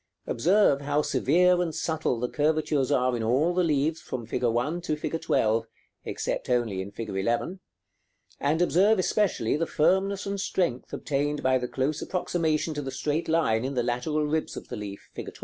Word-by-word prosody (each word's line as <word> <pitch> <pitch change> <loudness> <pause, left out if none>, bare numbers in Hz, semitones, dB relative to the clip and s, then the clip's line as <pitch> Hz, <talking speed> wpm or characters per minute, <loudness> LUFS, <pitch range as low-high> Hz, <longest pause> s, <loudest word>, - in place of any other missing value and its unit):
Observe 165 - +3
how 145 +1 +1
severe 175 +8 +3
and 165 -3 -2
subtle 160 -7 -1
the 125 - -1
curvatures 150 -2 +1
are 125 0 +2
in 115 - -2
all 135 +10 +2
the 180 0 +2
leaves 155 0 +1
from 120 -3 -5
fig. 115 - -3
1 125 +8 0
to 160 -3 -1
fig. 160 +2 -3
12, 115 -7 +1 0.4
except - - -3
only 115 -6 +1
in 95 - -6
fig. 115 +2 -7
11; 115 - -1 0.8
and 150 +4 +1
observe 195 +5 +4
especially 185 - +1
the 165 +2 -1
firmness 190 +5 +1
and 200 -1 -2
strength 170 -11 -1
obtained 145 +1 -2
by 130 0 +3
the 125 - -3
close 140 +5 -1
approximation 165 -3 -1
to 145 - -3
the 135 - -5
straight 150 +5 -2
line 140 -9 +2
in 135 +1 -3
the 120 - +1
lateral 125 +6 -1
ribs 155 +1 -2
of - - -9
the - - -4
leaf, 100 -2 -7
fig. - - -6
150 Hz, 185 wpm, -27 LUFS, 125-165 Hz, 0.8 s, observe